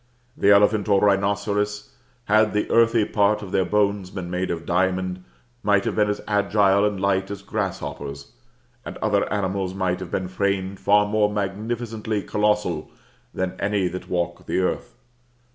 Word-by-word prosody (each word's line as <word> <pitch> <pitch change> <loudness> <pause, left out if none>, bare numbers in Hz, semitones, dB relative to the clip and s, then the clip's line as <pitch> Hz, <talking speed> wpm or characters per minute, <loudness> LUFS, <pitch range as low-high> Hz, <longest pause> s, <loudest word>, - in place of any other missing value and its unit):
The 100 - +2
elephant 105 +1 +4
or 100 -1 +5
rhinoceros, 105 +1 0 0.3
had 110 0 +3
the 105 - 0
earthy 115 -1 +4
part 105 0 +1
of 95 - -8
their 95 - +2
bones 100 0 +1
been 90 -2 -6
made 90 +1 -2
of 85 -1 -4
diamond, 95 0 0 0.4
might 100 -2 +2
have - - -1
been 105 -1 +2
as 105 - -3
agile 100 -1 +3
and 105 -2 -1
light 95 0 0
as 100 -1 -7
grasshoppers, 85 -9 -5 0.5
and - - -7
other - - 0
animals 95 -2 -1
might 95 -2 -1
have 95 -2 -7
been 95 - -2
framed 95 0 -2
far 105 0 +4
more 105 0 +1
magnificently 110 +1 -3
colossal 105 -7 0 0.4
than 95 -1 -2
any 100 -2 0
that 90 +1 -7
walk 85 -1 -2
the - - -1
earth. 90 -9 -1
100 Hz, 160 wpm, -23 LUFS, 95-105 Hz, 0.5 s, or